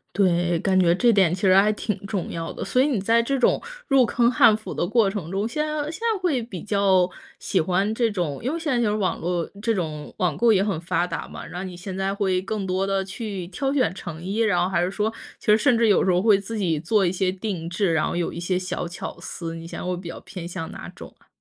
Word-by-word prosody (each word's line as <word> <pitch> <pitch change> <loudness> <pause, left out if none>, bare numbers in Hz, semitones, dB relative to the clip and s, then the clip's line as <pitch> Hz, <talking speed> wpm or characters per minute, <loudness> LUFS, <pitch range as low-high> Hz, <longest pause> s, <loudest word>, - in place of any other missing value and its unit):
对， 175 -3 +2
感 190 -1 +2
觉 175 -1 +4
这 240 +3 +4
点 185 -4 +3
其 185 - -10
实 190 -2 +5
还 205 +3 +5
挺 210 0 -2
重 200 -5 -3
要 165 0 -4
的。 - - -5
所 255 - +2
以 285 - +3
你 245 -9 0
在 230 +4 +3
这 275 +3 -1
种 250 - +3 0.2
入 270 -3 +4
坑 240 +1 +2
汉 220 -2 +6
服 215 - -7
的 175 - -1
过 215 -2 +3
程 190 -5 -5
中， 195 +3 -1
现 300 +6 -1
在 305 0 -2
现 330 - -9
在 455 -2 +1
会 295 -9 +1
比 200 -7 -7
较 195 -3 +3 0.3
喜 185 - 0
欢 190 +6 +1
这 230 0 +1
种 175 -8 -2
因 260 +7 -2
为 - - -1
现 320 -4 -2
在 245 - +2
这 220 - +2
种 210 - 0
网 190 -3 -1
络 175 0 -1 0.2
这 225 0 +1
种 155 -5 -4
网 175 -7 0
购 230 +1 +5
也 190 - +3
很 200 -6 -1
发 170 +1 0
达 175 - -5
嘛， - - -9
然 175 +2 -7
后 190 - -4
你 180 - -8
现 185 +2 -7
在 195 +1 -1
会 190 -2 +1
更 205 0 -3
多 190 +1 0
地 195 -1 0
去 195 -2 -5
挑 270 +9 -2
选 255 - +2
成 170 -2 -8
衣， 195 +4 -3
然 200 -6 +3
后 180 - 0
还 175 -2 +1
是 - - -2
说 210 +3 -1 0.3
其 - - -18
实 210 +1 +6
甚 250 0 +3
至 230 -1 +3
有 200 - +4
时 - - +2
候 180 0 +3
会 210 -2 +5
自 215 +3 -6
己 165 -6 0
做 205 +2 +2
一 175 - +2
些 185 0 0
定 185 -3 -4
制， 180 0 0
然 160 -1 +1
后 - - -3
有 175 -1 -1
一 - - -7
些 180 +1 0
小 185 -1 -3
巧 175 +1 -7
思， 165 -2 -6
你 165 0 -8
现 - - -7
在 - - -5
会 180 -1 -1
比 175 -1 -8
较 - - -6
偏 175 -3 -8
向 175 -2 -6
哪 - - -8
种 - - -11
啊？ - - -28
195 Hz, 300 characters per minute, -24 LUFS, 175-220 Hz, 0.3 s, 汉